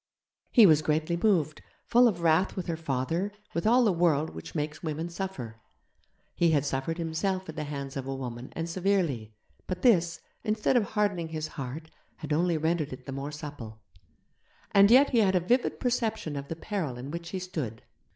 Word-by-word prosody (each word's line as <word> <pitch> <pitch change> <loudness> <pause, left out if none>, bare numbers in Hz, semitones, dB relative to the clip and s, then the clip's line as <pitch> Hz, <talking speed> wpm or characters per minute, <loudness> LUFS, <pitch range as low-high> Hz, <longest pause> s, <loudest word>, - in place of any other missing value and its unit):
He 230 - +8
was 155 -4 +6
greatly 155 +2 0
moved, 170 -6 +1 0.2
full 245 +1 +5
of 180 -7 -1
wrath 165 +3 +3
with 185 - -3
her 170 - -2
father, 165 +5 -2 0.2
with 170 +5 0
all 245 +3 +5
the 210 -5 +3
world 160 -3 +2
which - - -9
makes 150 0 -3
women 160 +1 -3
suffer. 135 - -6 0.7
He 170 - +3
had 145 -3 +2
suffered 140 +4 -2
himself 185 +3 -2
at 160 - -7
the 155 -1 -3
hands 140 -2 -5
of 135 -1 -4
a 135 - -3
woman 125 -1 -6
and 165 0 -3
severely, 170 - 0 0.3
but 180 -1 -4
this, 175 -8 +4 0.2
instead 215 +3 +1
of 240 - +4
hardening 200 -6 0
his 155 -1 -4
heart, 145 +4 -7 0.2
had 155 -1 -4
only 170 +1 +2
rendered 160 -1 0
it 130 0 -9
the 135 - -6
more 135 +2 -4
supple. 145 -8 -8 0.9
And 200 0 +6
yet 265 +5 +6
he 240 - +4
had 190 -3 +3
a - - +5
vivid 240 +9 +1
perception 225 - -1
of 140 0 -5
the 165 - -4
peril 165 - -3
in 130 +3 -7
which 170 +1 -6
he 190 - -3
stood. 155 - -5
165 Hz, 190 wpm, -28 LUFS, 145-190 Hz, 0.9 s, He